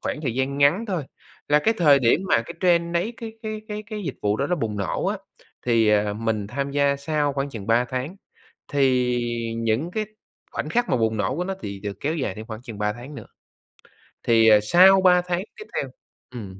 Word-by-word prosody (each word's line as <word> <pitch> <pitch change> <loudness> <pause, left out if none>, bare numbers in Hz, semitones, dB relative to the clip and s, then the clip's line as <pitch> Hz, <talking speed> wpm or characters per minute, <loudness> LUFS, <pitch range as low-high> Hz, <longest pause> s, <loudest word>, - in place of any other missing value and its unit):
khoảng - - -3
thời 125 -6 -2
gian 135 +2 -1
ngắn 145 +10 +4
thôi, 180 -8 -2 0.4
là 150 - +5
cái 225 +9 +1
thời 150 -7 +6
điểm 130 +5 +3
mà 115 - +3
cái - - -9
trend 170 -2 +2
nấy 180 +7 0
cái 225 -1 -7
cái 215 -1 -4
cái 210 0 -4
cái 215 -2 -6
dịch 145 -8 -4
vụ 105 0 +1
đó 140 - -1
nó 180 - +1
bùng 110 -8 -3
nổ 100 -3 -2
á, - - 0 0.5
thì, 115 -2 +3
à, 105 -1 +2
mình 110 -1 -2
tham 140 +5 -3
gia 140 0 +2
sau 145 0 -1
khoảng 135 +1 -2
chừng 110 -6 -8
3 115 +2 +3
tháng, 130 +9 -4 0.5
thì 125 -3 +2 0.4
những 115 +9 -1
cái 215 +2 -2 0.5
khoảnh - - -4
khắc 240 0 0
mà - - +2
bùng 110 -1 0
nổ 100 +4 -1
của 175 - -1
nó 195 +1 -3
thì 100 -1 -6
được 100 -1 -6
kéo 155 +3 -1
dài 130 - -2
thêm 110 - -8
khoảng 110 0 -8
chừng 115 -4 -9
3 105 0 0
tháng 125 +6 -10
nữa. - - -9 1.0
Thì, 115 -1 +4
à, 105 -1 +7
sau 185 - +6
3 180 -1 +5
tháng 180 +1 -2
tiếp 430 - -9
theo - - -2 0.4
ừm, 100 -6 -8
140 Hz, 225 wpm, -23 LUFS, 110-175 Hz, 1.0 s, à